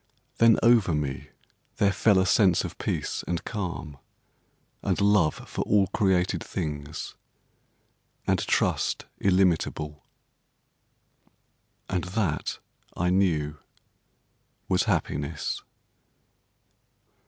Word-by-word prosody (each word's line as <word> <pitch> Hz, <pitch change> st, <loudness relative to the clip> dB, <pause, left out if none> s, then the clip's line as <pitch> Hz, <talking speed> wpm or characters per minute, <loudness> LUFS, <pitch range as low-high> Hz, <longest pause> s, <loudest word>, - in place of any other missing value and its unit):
Then 115 Hz, -1 st, +6 dB
over 115 Hz, -8 st, +5 dB
me 70 Hz, -1 st, -3 dB, 0.5 s
there 100 Hz, -1 st, +3 dB
fell 100 Hz, +1 st, +3 dB
a 95 Hz, -, +3 dB
sense 95 Hz, -3 st, +4 dB
of -, -, -7 dB
peace -, -, -2 dB
and 85 Hz, -1 st, -2 dB
calm, 85 Hz, -9 st, -5 dB, 0.8 s
and 95 Hz, -3 st, 0 dB
love 100 Hz, -6 st, +2 dB
for -, -, -4 dB
all 100 Hz, -1 st, +4 dB
created 95 Hz, -3 st, +1 dB
things, 75 Hz, -1 st, -5 dB, 1.1 s
and -, -, +2 dB
trust -, -, +1 dB
illimitable. 85 Hz, -5 st, +1 dB, 1.8 s
And 90 Hz, -2 st, -2 dB
that 90 Hz, -4 st, -2 dB, 0.4 s
I 90 Hz, 0 st, +1 dB
knew 80 Hz, -6 st, +1 dB, 1.1 s
was -, -, +2 dB
happiness. 75 Hz, +3 st, -2 dB
90 Hz, 90 wpm, -26 LUFS, 75-100 Hz, 1.8 s, Then